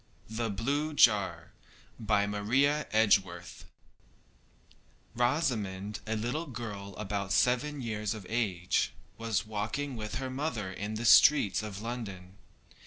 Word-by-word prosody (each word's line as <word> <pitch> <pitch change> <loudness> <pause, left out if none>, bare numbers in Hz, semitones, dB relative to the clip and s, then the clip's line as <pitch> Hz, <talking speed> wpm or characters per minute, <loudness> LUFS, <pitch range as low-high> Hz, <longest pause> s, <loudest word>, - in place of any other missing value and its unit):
] - - -30
THE 115 - 0
BLUE 140 +9 -1
JAR. 100 -10 +3 0.5
MARIA 110 +8 +1
EDGEWORTH 100 -5 +1 1.5
Rosamond, 110 - -1
a 110 - -1
little 125 +10 -2
girl 105 -6 -7
about 100 -2 -3
seven 130 - +2
years 105 -2 -2
of 105 -3 -9
age, 95 -6 0 0.3
was 115 -1 -1
walking 110 +6 -3
with 105 -1 -5
her 130 0 -3
mother 130 -8 -3
in 105 +3 -5
the 115 +2 -3
streets 110 -5 +6
of 105 -1 -7
London. 100 -6 -6
110 Hz, 115 wpm, -30 LUFS, 100-125 Hz, 1.5 s, streets